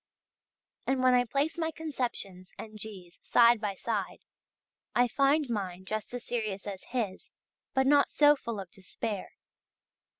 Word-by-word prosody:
And 265 -1 +1
when 255 0 +6
I 245 0 +4
place 285 +7 -1
my 320 -1 +1
conceptions 245 - -4
and 215 -1 -9
G's. 190 -5 -10
side 235 -1 +5
by 205 -3 -2
side, 205 -1 -3 0.7
I 245 0 +5
find 275 +4 +3
mine 190 -5 -3
just 215 +2 -3
as 245 - -6
serious 215 -5 -3
as 195 -2 -5
his 230 -7 -3 0.5
but 265 0 +4
not 285 +1 +5
so 295 0 +6
full 235 -6 -5
of 190 -3 -8
despair. 200 +1 -5
230 Hz, 145 wpm, -30 LUFS, 195-265 Hz, 0.7 s, when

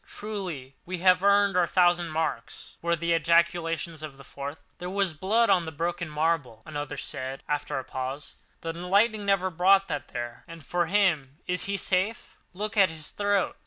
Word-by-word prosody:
Truly 185 -11 -6
we 185 +1 -4
have 185 0 +6
earned 200 -1 +4
our 180 -1 +3
thousand 175 -1 +3
marks!" 160 +1 -4
were 170 0 +1
the 170 +1 0
ejaculations 165 -1 +1
of 145 -3 -8
a - - -11
fourth. 140 +2 -7 0.2
"There 180 0 -4
was 195 -2 0
blood 200 +8 +2
on 180 -3 +3
the 160 - -5
broken 170 +2 -3
marble," 150 -7 -1
another 145 -1 -5
said 135 -2 -5
after 145 -2 -2
a 130 - -3
pause—"the 135 +5 -7
lightning 200 +5 +1
never 190 -2 +2
brought 190 +3 +4
that 145 -3 -3
there. 120 0 -6
And 165 -4 -11
for 175 -1 0
him—is 180 -3 0
he 200 0 -1
safe? 190 +4 0 0.2
Look 210 +4 -4
at 195 -3 +6
his 155 -1 -5
throat! 205 -2 0
170 Hz, 170 wpm, -27 LUFS, 150-190 Hz, 0.2 s, have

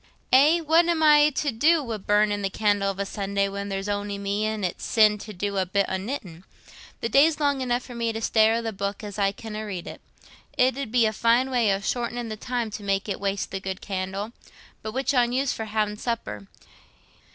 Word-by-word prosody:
"Eh, 300 +6 +6
what 325 +2 +4
am 335 -2 +1
I 300 -1 +7
to 290 0 -1
do 300 +7 +3
wi' 230 -4 -4
burnin' 205 0 +1
candle 205 -1 +1
of 195 - -4
a 200 - -2
Sunday, 200 0 -1
when 200 +1 -5
there's 195 0 -3
on'y 205 0 -2
me 200 +2 -1
an' 215 -2 -3
it's 180 - -3
sin 215 -2 +4
to 215 - -8
do 200 +1 -3
a 190 - +1
bit 200 +2 +1
o' 190 - -1
knittin'? 190 -5 -6 0.6
The - - 0
daylight's 300 +4 +4
long 285 -2 +1
enough 245 -1 0
for 250 - -10
me 235 -1 -1
to 225 - -4
stare 220 0 +3
i' 230 - -1
the 225 -1 -4
booke 200 +2 -4
as 205 0 -6
I 195 -1 +2
canna 215 +1 -7
read. 190 -5 -5 0.7
It 255 0 +3
'ud 275 -6 -4
be 240 -2 +4
a 215 - +1
fine 235 +4 +2
way 235 -5 +2
o' 195 0 0
shortenin' 240 +1 -2
the 215 - -4
time, 240 0 -3
to 210 - -6
make 195 0 -1
it 200 - -3
waste 200 0 -2
the 195 - -3
good 190 0 -5
candle. 195 +2 -4 0.5
But 215 - -6
which 265 +3 0
on 245 -2 +2
you's 265 +1 +1
for 220 - -5
ha'in' 210 -1 -1
supper? 155 - -4
215 Hz, 220 wpm, -25 LUFS, 200-245 Hz, 0.7 s, I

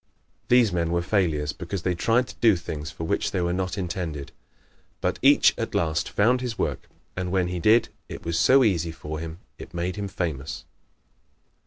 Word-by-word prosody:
These 120 -5 +4
men 85 -2 0
were 85 0 +1
failures 80 -7 0
because 90 -1 -5
they 90 - +1
tried 115 +8 +2
to - - -9
do 110 -4 +6
things 75 -3 -5
for 80 - -8
which 80 - 0
they - - -2
were 85 0 0
not 95 +1 -2
intended. 85 -6 -4 0.7
But - - -1
each - - +6
at - - -3
last 80 -2 0
found 125 +5 +2
his 125 -3 -4
work, - - -3 0.3
and 90 -1 -3
when 90 -2 +1
he 90 0 -3
did, 110 +6 +4 0.2
it - - -8
was 85 0 0
so 135 +1 +6
easy 85 -7 +1
for 75 -1 -6
him 80 0 -6 0.2
it - - -10
made 90 +3 -2
him 100 -1 -3
famous. 80 -6 -4
90 Hz, 190 wpm, -25 LUFS, 80-100 Hz, 0.7 s, do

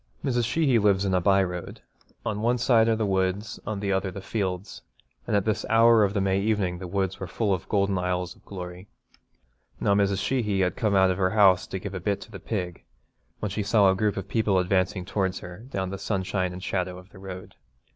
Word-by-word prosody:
Mrs. 120 -3 +1
Sheehy 135 -4 +3
lives 100 -2 +3
in 95 - 0
a 90 - +3
by 95 +1 +4
road. 90 -1 -5 0.5
On 105 -1 -2
one 120 +2 +2
side 115 -2 +4
are 115 - +3
the 110 -1 -1
woods, 95 +2 -1
on 110 -2 -2
the 100 -1 -1
other 95 0 0
the 95 - -7
fields, 95 -2 -3 0.5
and - - +1
at 100 - +2
this 110 0 0
hour 115 0 +6
of 100 +1 0
the - - +2
May 95 0 +1
evening 100 -4 0
the 90 - -6
woods 95 0 -2
were 95 - -5
full 100 +3 0
of 90 - -4
golden 100 -2 +1
aisles 90 0 -2
of - - -24
glory. 90 0 -8 0.9
Now 100 - +2
Mrs. 100 -1 +2
Sheehy 105 -2 0
had 90 -1 +1
come 110 -6 +1
out 95 -1 +5
of 90 - -3
her 95 -1 +3
house 95 -3 +5
to - - -4
give 100 +1 -6
a 95 - -3
bit 100 +2 -1
to 110 - -11
the 95 - -8
pig, 90 -6 -4 0.6
when 105 - -2
she 105 - -2
saw 100 -1 +4
a - - 0
group 105 +1 0
of 95 0 -4
people 105 -2 +1
advancing 95 0 +1
towards 95 -1 -1
her 90 +6 -10
down 95 -6 -3
the 100 - -5
sunshine 95 -2 -1
and 90 +1 -8
shadow 90 -2 -2
of 90 +2 -14
the 95 - -14
road. 95 -1 -8
95 Hz, 230 wpm, -26 LUFS, 95-105 Hz, 0.9 s, hour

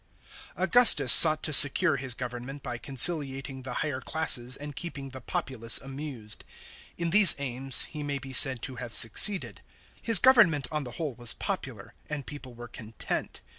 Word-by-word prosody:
§ - - -38
1. - - -5
AUGUSTUS 190 - +5
sought 155 -1 +6
to 155 - -2
secure 145 +3 +5
his 130 -2 -8
government 125 +3 -10
by 120 -1 -8
conciliating 135 -1 -1
the 130 -1 -10
higher 140 -4 -6
classes 130 -6 +1
and 145 -1 -11
keeping 140 -5 -9
the 130 0 -12
populace 115 -1 0
amused. 135 -6 -11 0.5
In 170 -1 -5
these 205 -3 +7
aims 135 -1 -1
he 150 - -10
may 145 -1 -5
be 135 0 -12
said 130 -2 +4
to 130 -2 -5
have 120 -2 -10
succeeded. 185 - 0 0.4
His 230 -2 +2
government 195 - +2
on 150 -2 -6
the 125 - -11
whole 155 -5 -6
was 120 0 -6
popular, - - -8 0.2
and 150 -3 -8
people 130 -4 -12
were 120 +1 -12
content. 110 -1 -9
135 Hz, 170 wpm, -25 LUFS, 125-155 Hz, 0.5 s, these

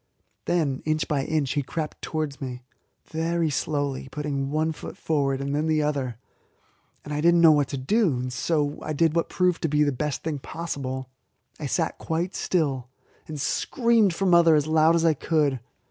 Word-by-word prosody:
Then 150 -7 0
inch 155 0 0
by 140 -3 0
inch 150 -5 0
he 145 - 0
crept 150 +3 -5
towards 155 -3 -3
me, 125 -2 -6 0.5
very 165 0 0
slowly, 140 -2 -2
putting 140 -1 -3
one 155 +2 0
foot 155 - -8
forward 140 -4 0
and 140 +1 -3
then 150 +2 0
the 155 -1 +2
other. 135 -6 -2 0.9
I 150 0 -3
did 170 +2 +5
not 170 - +4
know 165 -2 +8
what 145 -3 +3
to 140 - -4
do, 165 - +1
and 125 0 -4
so 150 +1 0 0.2
did 160 +1 +2
what 170 - +1
proved 180 -2 +1
to - - +1
be 150 +1 +3
the 145 - +2
best 145 +2 -3
thing 155 -3 -2
possible: 130 -3 -5 0.5
I - - -3
sat - - -1
quite 170 +3 -2
still, 135 -8 -1 0.4
and 155 -2 -6
screamed 225 - +2
for 195 - -1
mother 170 -3 +6
as 150 -1 +2
loud 160 +1 +4
as 170 0 +2
I 165 - +5
could. 145 -3 0
150 Hz, 185 wpm, -25 LUFS, 140-165 Hz, 0.9 s, know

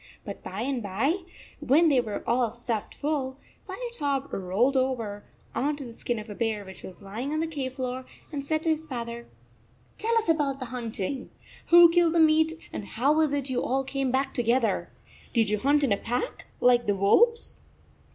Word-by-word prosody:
But - - -7
by - - -5
and 260 -1 -1
by, 230 - 0 0.4
when 320 +5 +4
they 265 -4 +4
were 215 -3 -5
all 240 0 +2
stuffed 235 -2 -4
full, 275 -3 -2 0.3
Firetop 335 - -3
rolled 200 +9 +1
over 235 -6 -1 0.3
on 290 +3 0
to 285 - -7
the 235 -3 -9
skin 240 +1 -3
of 215 +1 -7
a 210 - -6
bear 215 -2 -2
which 190 0 -10
was 185 +2 -11
lying 225 +8 -4
on 310 - 0
the 325 - +1
cave 280 -5 -4
floor, 255 -1 -4 0.3
and 285 -2 -3
said 310 +2 0
to 330 - +1
his 315 0 0
father: 235 -2 -5 0.7
"Tell 460 +1 +2
us 450 - +1
about 295 -4 +1
the 260 - -5
hunting. 240 +1 -4 0.4
Who 340 0 +8
killed 340 -1 +4
the - - +4
meat, 320 0 +5 0.2
and 205 - -4
how 265 +6 +2
was 310 -2 +2
it 280 -2 -2
you 250 - 0
all 270 +2 0
came 270 0 -1
back 265 +2 0
together? 240 0 +1 0.4
Did 225 -4 +2
you 210 - +1
hunt 285 +4 +3
in 265 - +2
a 200 - +3
pack, 245 - -3
like 245 -2 +4
the 205 - +2
wolves 455 - +3
265 Hz, 195 wpm, -27 LUFS, 235-305 Hz, 0.7 s, Who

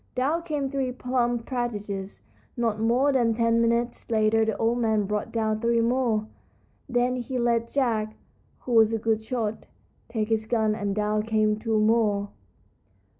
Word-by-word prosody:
Down 285 +7 0
came 300 -5 -2
three 265 -2 -2
plump 245 -2 -1
partridges. 210 -6 -4 0.3
Not 225 -3 0
more 245 +6 +3
than 235 -4 +2
ten 230 0 +2
minutes 235 +1 0
later 220 0 +3
the 220 -1 -1
old 230 +2 +1
man 220 -3 +2
brought 210 +1 -3
down 220 -1 -1
three 235 0 +2
more. 230 -2 +1 0.6
Then 245 +1 +1
he 250 +1 -4
let 235 -1 0
Jack, 220 -6 0 0.5
who 250 - -6
was 225 -1 +5
a - - +1
good 220 0 0
shot, 220 -2 -3 0.4
take 220 -2 -2
his 220 -1 0
gun, 220 -2 +1
and 205 -2 -2
down 210 0 0
came 215 -1 +1
two 220 0 -1
more. 215 -2 +2
230 Hz, 160 wpm, -26 LUFS, 215-245 Hz, 0.6 s, was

